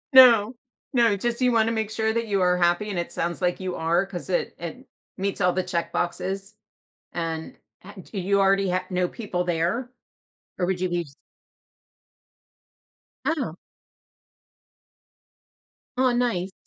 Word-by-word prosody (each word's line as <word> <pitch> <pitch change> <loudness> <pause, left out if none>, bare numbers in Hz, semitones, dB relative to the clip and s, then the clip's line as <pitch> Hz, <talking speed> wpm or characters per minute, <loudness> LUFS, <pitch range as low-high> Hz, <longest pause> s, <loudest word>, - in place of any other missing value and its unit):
No, 235 -3 +8 0.4
no, 230 -5 +4
just 240 +4 -2
you 250 -1 +4
wanna 225 0 +3
make 220 -2 -1
sure 220 0 0
that 230 -1 -1
you 200 -2 +1
are 180 0 +4
happy 175 +4 +2
and 180 - -2
it 170 - -4
sounds 170 +1 -2
like 180 +1 +1
you 185 -1 -3
are 170 +4 +1
'cause 190 -3 -7
it - - 0
it - - -7 0.3
meets 200 +1 -2
all 180 0 +3
the 185 - 0
checkboxes 185 +3 -2 0.6
and 165 -1 -4 0.3
h 190 -2 -12
d 200 - -5
you 200 +2 +2
already 195 -1 +3
h 185 0 +1
know 180 0 +1
people 185 -4 -3
there 175 +9 0 0.7
or 180 - +2
would 185 -1 -1
you 185 - +1
be 175 -1 -1 2.2
Oh. 275 - -1 2.4
Oh, 255 0 +4
nice. 230 -7 0
195 Hz, 145 wpm, -25 LUFS, 175-220 Hz, 2.4 s, No